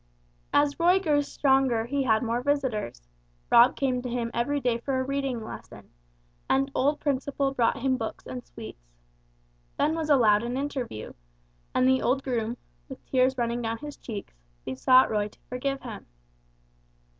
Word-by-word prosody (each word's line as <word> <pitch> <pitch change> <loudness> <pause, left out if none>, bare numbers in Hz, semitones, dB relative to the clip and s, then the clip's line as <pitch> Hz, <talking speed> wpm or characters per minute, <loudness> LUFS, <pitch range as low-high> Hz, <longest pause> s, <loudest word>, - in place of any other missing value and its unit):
As 290 +1 +2
Roy 355 +3 +5
grew 300 -6 +2
stronger 265 -5 +2
he 280 +3 -1
had 225 -3 +2
more 235 +1 -1
visitors; 245 - -2 0.4
Rob 235 +1 +7
came 255 -2 0
to 250 - -5
him 235 -1 -2
every 285 +5 0
day 245 -3 0
for 260 +2 -1
a - - 0
reading 270 -3 -2
lesson, - - -10 0.6
and 275 +1 +2
old 290 +3 +1
Principle 275 -1 -1
brought 240 -2 +2
him 260 0 +1
books 225 -2 -5
and 125 -1 -6
sweets. - - -11 0.9
Ben 305 - +2
was 320 -1 -3
allowed 220 -7 +5
an 240 +2 -3
interview, 265 - -4 0.6
and 255 - +4
the 260 0 +3
old 270 +2 +1
groom, 235 -2 -2 0.3
with 265 - -10
tears 260 0 +2
running 235 0 -1
down 225 0 -2
his 295 +3 -8
cheeks, 210 -4 -7 0.3
besought 255 - +4
Roy 210 -1 +1
to 210 - -19
forgive 270 +2 -3
him. 230 -4 -8
255 Hz, 160 wpm, -27 LUFS, 230-275 Hz, 0.9 s, Rob